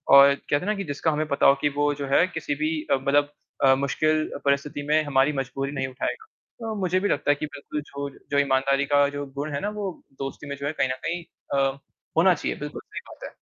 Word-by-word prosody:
और 140 0 +9
कहते 145 - -2
हैं 165 - -5
ना 210 - +1
कि 195 - -3
जिसका 150 0 -1
हमें 155 +1 -1
पता 140 -2 +1
हो 140 - +7
कि 145 - +3
वो 145 0 +2
जो 140 -1 -4
है 140 +6 +4
किसी 290 +9 -3
भी 310 - 0 0.2
अ, - - +6
मतलब 140 +2 +2 0.3
अ, 135 -1 +7
मुश्किल 155 +3 +1 0.2
परिस्थिति 140 +1 0
में 155 +1 +4
हमारी 140 0 +2
मजबूरी 135 +1 -3
नहीं 135 -2 -2
उठाएगा। 130 - -4 0.5
अ, - - -2
मुझे 185 -1 +1
भी 205 - 0
लगता - - 0
है - - +3
कि 150 - -4
बिल्कुल 145 +1 -6
जो 140 0 -4 0.2
जो 140 - +2
ईमानदारी 140 0 +2
का 145 0 +4
जो 145 0 -4
गुण 150 +2 -3
है 140 - -1
ना, 205 - -1
वो 205 -4 -5 0.2
दोस्ती 135 +1 -5
में 140 - -4
जो 140 - -5
है - - 0
कहीं 135 -4 +1
न - - +1
कहीं 175 +1 -2 0.3
अ, 135 0 +2 0.4
होना 180 +2 +6
चाहिए 150 - -3
बिल्कुल, 150 0 -6
सही - - -3
बात - - -12
है। - - -8
145 Hz, 245 wpm, -25 LUFS, 140-155 Hz, 0.5 s, और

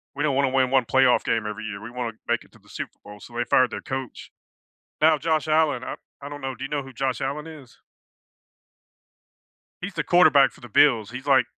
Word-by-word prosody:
we 145 - -2
don't 145 -3 +1
wanna 140 -1 +2
win 130 -1 +1
1 135 -2 +4
playoff 130 0 +3
game 115 -1 0
every 105 +1 -5
year, 100 -2 -6
we 115 - -9
wanna 120 -2 -4
make - - 0
it - - -24
to - - -19
the - - -24
Super - - -7
Bowl," 105 0 -11
so 120 - -13
they 120 - +1
fired 130 +1 +3
their - - -6
coach. 130 -2 -6 0.7
Now, 155 -1 +5
Josh 155 -1 0
Allen 155 -5 +2
I - - -5 0.3
I 140 - -6
don't 145 0 -8
know. 135 0 -4
Do 130 +2 -7
you 135 - -6
know 145 -1 -1
who 135 0 -12
Josh 130 -1 -2
Allen 150 +3 -3
is? 145 -6 -13 2.0
He's 195 +1 -6
the 150 - -2
quarterback 145 -5 +5
for - - -19
the 120 - -11
Bills. 115 -3 +4
He's, 125 +3 -8
like 135 -2 +4
135 Hz, 230 wpm, -24 LUFS, 120-145 Hz, 2.0 s, Now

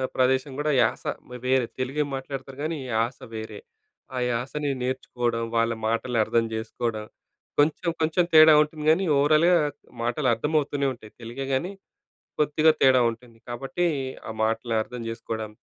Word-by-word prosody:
ప్రదేశం 130 +2 +2
కూడా 150 +1 +1
యాస, - - +1 0.4
వేరే 130 -1 +3
తెలుగే 135 +4 0
మాట్లాడతారు 135 0 -7
కానీ, 160 +1 -2 0.2
యాస 115 +3 0 0.2
వేరే. 110 -1 -6 0.6
ఆ - - -2
యాసని 135 +5 -2
నేర్చుకోవడం, 125 -2 -2
వాళ్ళ 115 0 +2
మాటలు 115 +2 -1
అర్థం 115 +1 +1
చేసుకోవడం. 110 0 -3 0.5
కొంచెం, 155 +3 +2
కొంచెం 160 +3 +2
తేడా 155 0 +9
ఉంటుంది 150 0 -3
గానీ, 185 +4 +2
ఓవరాల్‌గా 155 +5 +4 0.5
మాటలు 120 +4 0
అర్థమవుతూనేవుంటాయి. 140 -3 -1
తెలుగే 120 +4 -5
గానీ, 170 +8 -1 0.7
కొద్దిగా 155 +1 +4
తేడా 130 -1 +6
ఉంటుంది. 115 0 -14
కాబట్టి, 135 +8 -2 0.4
ఆ - - -3
మాటలు 115 +1 0
అర్థం 125 +2 -8
చేసుకోవడం, 110 -1 -5
130 Hz, 130 wpm, -25 LUFS, 115-150 Hz, 0.7 s, తేడా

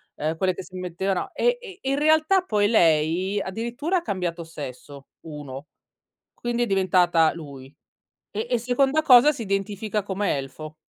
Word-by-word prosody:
uhm, 155 +2 -2
quelle 185 0 0
che 190 - -7
si 185 - -14
mettevano 185 +1 -2
e 485 0 +1
e 390 -6 -10
e 265 - -5
in 275 - 0
realtà 315 +5 +4
poi 210 - +1
lei 175 0 +2
addirittura 235 - -2
ha 350 - -1
cambiato 180 - -3
sesso, 140 -3 -9
1 145 -2 -9 0.7
quindi 240 0 -2
è - - +1
diventata 180 -5 +3
lui. 140 -5 -10 0.7
E 220 +3 -4
e 245 - +2
seconda 265 +5 +1
cosa 260 0 +7
si 265 -6 -5
identifica 200 +1 -2
come 195 -3 -1
elfo. 150 +3 -8
195 Hz, 160 wpm, -24 LUFS, 165-245 Hz, 0.7 s, cosa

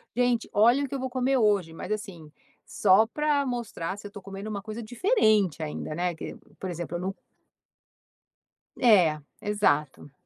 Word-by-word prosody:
"Gente, 245 -2 +1
olha 240 +7 +5
o - - -2
que - - -9
eu - - -3
vou 260 0 -3
comer 260 +1 +1
hoje", 200 -7 +2
mas 180 - -7
assim, 175 -8 -5 0.4
só 205 +2 +4
para 295 +1 0
mostrar 230 -8 -4
se 205 - -9
eu - - -14
tô 200 - -10
comendo 195 +2 -7
uma 200 -2 -4
coisa 215 +3 -6
diferente 215 - +2
ainda, 155 0 -4
né, 175 0 -1
que, - - -7 0.2
por 190 - -4
exemplo, 175 0 -5
eu - - -6
num 190 +1 -2 1.7
É, 180 -11 +5 0.2
exato. 150 -9 0
205 Hz, 170 wpm, -27 LUFS, 175-245 Hz, 1.7 s, olha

